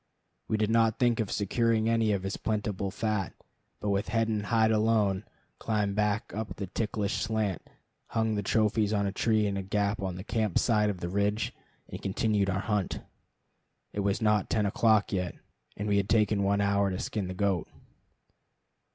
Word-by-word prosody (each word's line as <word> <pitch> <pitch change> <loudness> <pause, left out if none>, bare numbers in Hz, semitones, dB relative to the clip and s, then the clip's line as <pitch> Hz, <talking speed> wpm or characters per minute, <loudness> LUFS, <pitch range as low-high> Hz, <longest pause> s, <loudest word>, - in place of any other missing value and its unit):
We 110 - 0
did 110 0 +1
not 115 -1 +3
think 120 -2 +2
of 110 -4 -1
securing 110 +2 +1
any 115 -1 +2
of 100 -2 -1
his 95 0 -2
plentiful 105 -2 -2
fat, 105 -2 -2 0.4
but 105 - -2
with 100 0 0
head 115 +1 +1
and 105 -2 -1
hide 110 -1 +3
alone 105 -3 +2 0.3
climbed 105 -3 0
back 105 +1 0
up 110 +1 -4
the 100 - -4
ticklish 105 +1 -2
slant, 105 -4 -2 0.4
hung 110 -1 0
the 105 - 0
trophies 110 +1 +1
on 100 -1 +1
a 100 - 0
tree 110 +1 +2
in 100 -1 -1
a - - -1
gap 100 +2 -1
on 95 -2 -3
the 90 - -7
camp 110 -3 0
side 105 -3 +3
of 95 -4 -4
the 85 - -2
ridge, 100 +3 0 0.3
and - - -8
continued 100 0 +1
our 95 +1 0
hunt. 105 -4 -1 0.9
It - - -3
was 100 +2 0
not 105 -2 +2
ten 105 -2 +1
o'clock 110 +1 +3
yet, 90 -2 -1 0.4
and 105 - -3
we 100 -1 +2
had 100 0 0
taken 105 -2 +3
one 100 +1 +2
hour 100 0 +2
to 90 - -3
skin 100 -1 -3
the 95 - -5
goat. 95 -3 0
105 Hz, 185 wpm, -29 LUFS, 100-110 Hz, 0.9 s, not